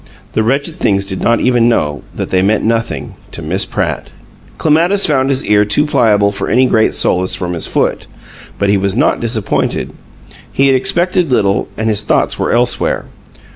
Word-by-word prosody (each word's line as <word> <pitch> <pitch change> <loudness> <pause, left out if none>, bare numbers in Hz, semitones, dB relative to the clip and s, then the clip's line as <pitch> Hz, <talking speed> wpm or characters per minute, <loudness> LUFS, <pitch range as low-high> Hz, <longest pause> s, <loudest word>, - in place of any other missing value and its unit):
The - - +1
wretched 140 +8 -1
things 100 -1 0
did 95 -1 -2
not 115 0 +1
even 120 -2 +2
know 75 -10 -1
that - - -5
they 95 - +2
meant 105 +3 +1
nothing 115 +1 -2 0.2
to 85 - -5
Miss 90 +6 -1
Pratt! - - -3 0.5
Clematis 170 +6 +2
found 135 -3 +1
his 135 +1 +1
ear 105 0 +3
too 105 +9 +2
pliable 105 -8 +2
for 100 - -4
any 130 +2 +3
great 110 -3 +1
solace 90 +1 +1
from 90 -1 -3
his 85 - -2
foot, - - -1 0.5
but 100 - 0
he 100 - +3
was 100 0 -1
not - - +1
disappointed; 115 -3 -1 0.6
he 135 - +1
had 135 -1 +4
expected 175 +3 +1
little, 100 -4 +1
and 110 - -2
his 105 -1 +1
thoughts 105 - 0
were - - -1
elsewhere. 120 +1 +1
110 Hz, 180 wpm, -14 LUFS, 100-130 Hz, 0.6 s, had